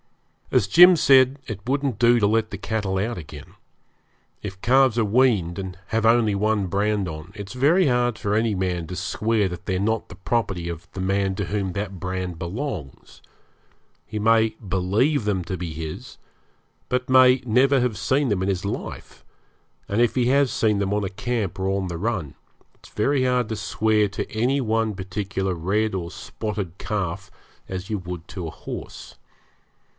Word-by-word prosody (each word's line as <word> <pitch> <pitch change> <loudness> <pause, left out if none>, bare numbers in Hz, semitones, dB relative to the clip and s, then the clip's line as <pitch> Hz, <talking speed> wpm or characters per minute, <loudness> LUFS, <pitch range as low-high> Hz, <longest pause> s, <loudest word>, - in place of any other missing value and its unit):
As 95 - +2
Jim 175 - +8
said, 135 -1 +5
it 105 -4 -5
wouldn't 135 -3 -1
do 120 0 +5
to 105 - +3
let 110 +1 +1
the 100 - -6
cattle 100 -2 -2
out 110 +5 -1
again. 80 - -10 0.9
If 100 -2 -7
calves 130 -1 +4
are 115 - +3
weaned, 105 -7 +2
and 95 -1 -6
have 115 0 0
only 115 -2 +4
one 105 -1 +1
brand 100 +1 0
on, 80 +2 -8
it 100 -2 -7
is - - -7
very 150 +9 +3
hard 120 -2 +1
for 100 - -2
any 110 0 +2
man 90 -3 -2
to 90 - -6
swear 105 +2 0
that 90 -2 -7
they 95 -2 -1
are - - -2
not 110 +2 -1
the 90 - -10
property 95 -1 -2
of 85 -1 -7
the - - -8
man 95 +1 0
to - - -2
whom 100 -2 -2
that 100 -2 -4
brand 90 -1 -3
belongs. 95 - -6 0.8
He 105 - -5
may 110 0 +3
believe 100 +10 +1
them 100 -3 0
to 95 - -3
be 85 -2 -5
his, 80 0 -7 0.7
but 125 0 -1
may 130 0 +6
never 130 +4 +4
have 120 -4 0
seen 135 +7 +1
them 100 -5 0
in 95 - 0
his 95 0 -2
life; 100 - -6 0.6
and 105 +3 +1
if 120 - +2
he 125 -2 +2
has 135 0 +3
seen 105 -3 +1
them 100 0 0
on 105 0 0
a - - -2
camp 110 -2 -3
or 95 0 0
on 95 -1 -1
the 85 -1 -4
run, 95 - -2 0.4
it's - - -18
very 130 +5 +1
hard 125 -2 +1
to 110 - -2
swear 105 0 +1
to 105 - -5
any 125 +6 +1
one 110 -3 0
particular 95 0 -3
red 100 +6 0
or 85 -2 -4
spotted 100 -3 -5
calf 95 -2 -3 0.4
as 95 0 -5
you 105 -2 -1
would 90 -2 -7
to 90 -6 -5
a - - -6
horse. - - -8
105 Hz, 185 wpm, -23 LUFS, 95-120 Hz, 0.9 s, Jim